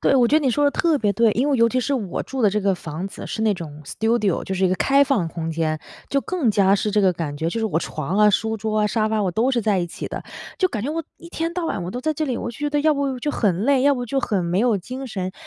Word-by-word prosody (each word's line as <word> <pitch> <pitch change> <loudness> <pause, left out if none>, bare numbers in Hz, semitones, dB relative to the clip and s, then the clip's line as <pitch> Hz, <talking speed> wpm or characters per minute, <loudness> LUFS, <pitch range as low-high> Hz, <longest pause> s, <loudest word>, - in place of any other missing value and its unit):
对， - - +3
我 245 -3 +4
觉 300 - +5
得 305 - -4
你 265 - +3
说 290 +5 +1
得 285 - +4
特 320 0 +1
别 210 -4 +1
对， 230 +2 +3
因 255 +7 +1
为 280 - +2
尤 230 -1 +4
其 255 +2 0
是 265 +4 -1
我 210 -9 -3
住 265 -2 -4
的 210 - +5
这 210 +2 0
个 195 -1 +2
房 170 +2 -6
子 - - -9
是 - - -4
那 215 -2 +3
种 155 -4 -8
studio， 220 +2 0
就 190 - -3
是 190 0 +1
一 - - +1
个 185 - +1
开 275 +7 +4
放 265 - +1
空 165 0 -4
间， 160 -1 -1 0.3
就 280 - +2
更 320 -7 0
加 195 -1 +4
是 210 +1 0
这 210 0 +2
个 190 -2 +4
感 160 -3 -4
觉。 160 +3 -1
就 200 - -3
是 225 - -1
我 165 -6 0
床 165 +3 -3
啊、 210 0 +6
书 220 +2 +1
桌 215 0 -1
啊、 210 - +3
沙 215 0 0
发 215 -1 0
我 190 - 0
都 225 +8 +1
是 250 -3 +1
在 205 -2 +2
一 175 - -1
起 170 - -7
的， - - -6 0.4
就 370 - +3
感 215 - -4
觉 275 - -2
我 330 +1 -2
一 340 - -13
天 330 0 -2
到 355 -1 -2
晚 200 - -2
我 175 - -4
都 245 - -5
在 310 +4 0
这 310 +1 -2
里， 255 -3 -1
我 235 - -4
就 230 - -12
觉 295 0 -1
得 295 0 +1
要 310 +1 +4
不 275 -3 -1
就 295 +4 -2
很 200 -7 0
累， 275 0 +3
要 285 +1 +4
不 245 -2 -3
就 270 +3 -1
很 200 -7 -1
没 175 +2 0
有 235 -2 +3
精 255 +8 -6
神。 185 -6 -4
220 Hz, 365 characters per minute, -22 LUFS, 190-270 Hz, 0.4 s, 啊